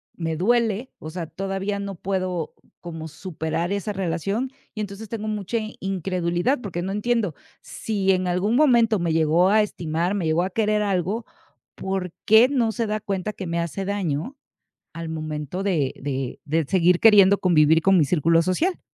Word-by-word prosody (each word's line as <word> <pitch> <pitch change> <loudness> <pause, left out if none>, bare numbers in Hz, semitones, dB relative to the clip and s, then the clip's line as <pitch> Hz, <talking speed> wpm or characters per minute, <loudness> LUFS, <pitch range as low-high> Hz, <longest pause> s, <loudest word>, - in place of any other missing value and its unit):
me 165 -2 -3
duele, 230 +5 +1
o 155 - -7
sea, 170 -1 -5
todavía 195 +2 -3
no 200 -1 -5
puedo 185 -3 -3 0.3
como 165 -2 -7
superar 160 +1 -4
esa 200 +1 -2
relación. 195 +7 -2 0.2
Y 215 - -4
entonces 205 +1 -7
tengo 215 -2 -4
mucha 210 +1 -2 0.2
incredulidad, 185 - -1
porque 175 -4 -4
no 190 - -3
entiendo, 210 -4 0 0.3
si 195 -3 -1
en 185 -1 +1
algún 190 +6 +1
momento 235 -7 +4
me 170 -2 0
llegó 165 +3 +3
a 215 +1 +5
estimar, 170 -2 -2
me 185 - -1
llegó 160 +2 +2
a 190 - -2
querer 210 +1 +1
algo, 200 +3 -1 0.5
¿por 190 -2 -3
qué 220 +3 +7
no 240 -5 +1
se 225 +1 -2
da 215 0 -1
cuenta 205 0 -3
que 190 - -6
me 170 0 -1
hace 170 +3 -3
daño, 190 - -2 0.6
al 165 -1 -6
momento 155 +2 -4
de 160 -9 0
de 135 -2 -3
de 160 +1 +1
seguir 180 +2 +3
queriendo 200 -3 +7
convivir 160 -2 +4
con 195 0 +4
mi 160 - +5
círculo 165 0 +3
social? 315 - 0
190 Hz, 170 wpm, -23 LUFS, 165-210 Hz, 0.6 s, qué